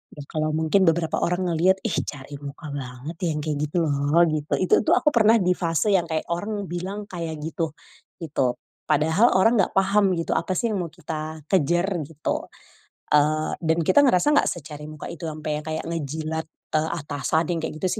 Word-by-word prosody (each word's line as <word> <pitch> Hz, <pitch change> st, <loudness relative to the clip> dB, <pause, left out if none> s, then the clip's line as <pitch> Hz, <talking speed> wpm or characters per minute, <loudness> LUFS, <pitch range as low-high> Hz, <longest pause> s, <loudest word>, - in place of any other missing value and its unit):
ya 145 Hz, -, -8 dB
kalo 155 Hz, 0 st, 0 dB
mungkin 160 Hz, +5 st, +3 dB
beberapa 165 Hz, 0 st, +2 dB
orang 180 Hz, 0 st, 0 dB
ngeliat, 180 Hz, +4 st, +3 dB
ih, 210 Hz, -, 0 dB
cari 140 Hz, 0 st, -7 dB
muka 145 Hz, +1 st, -8 dB
banget 135 Hz, +3 st, -6 dB
yang 150 Hz, -, -2 dB
kayak 155 Hz, -2 st, -2 dB
gitu 175 Hz, -, -3 dB
loh 145 Hz, +3 st, +3 dB
gitu 155 Hz, -1 st, -2 dB
itu 185 Hz, -, +4 dB
tuh 345 Hz, -, +6 dB
aku 300 Hz, -4 st, +3 dB
pernah 225 Hz, -1 st, +5 dB
di 180 Hz, -3 st, +2 dB
fase 170 Hz, +2 st, +1 dB
yang 180 Hz, -4 st, +2 dB
kayak 160 Hz, 0 st, -2 dB
orang 205 Hz, +4 st, -2 dB
bilang 190 Hz, +4 st, -5 dB
kayak 165 Hz, -3 st, -4 dB
gitu 160 Hz, -1 st, -3 dB, 0.5 s
gitu 135 Hz, -5 st, 0 dB, 0.3 s
padahal 160 Hz, +10 st, +3 dB
orang 225 Hz, +4 st, +4 dB
gak 190 Hz, -, +2 dB
paham 195 Hz, -1 st, +3 dB
gitu 165 Hz, -, -2 dB
apa 185 Hz, +2 st, 0 dB
sih 230 Hz, +4 st, 0 dB
yang 200 Hz, -, -1 dB
mau 170 Hz, -, -5 dB
kita 155 Hz, -1 st, -6 dB
kejar 175 Hz, +1 st, +2 dB, 0.2 s
gitu, 155 Hz, -1 st, -3 dB, 0.7 s
eee, 155 Hz, +1 st, +3 dB
dan 160 Hz, 0 st, +1 dB
kita 185 Hz, -, +4 dB
ngerasa 245 Hz, +4 st, +4 dB
nggak -, -, +4 dB
secari 150 Hz, -2 st, -7 dB
muka 155 Hz, -1 st, -8 dB
itu 170 Hz, 0 st, -7 dB
ampe 155 Hz, 0 st, -4 dB
yang 150 Hz, -, -11 dB
kayak 160 Hz, 0 st, -3 dB
ngejilat, 160 Hz, 0 st, -3 dB, 0.3 s
eee, 155 Hz, +1 st, +2 dB
atasan 145 Hz, +2 st, -1 dB
yang 170 Hz, -, -1 dB
kayak 160 Hz, -, -4 dB
gitu -, -, +3 dB
160 Hz, 190 wpm, -24 LUFS, 155-185 Hz, 0.7 s, tuh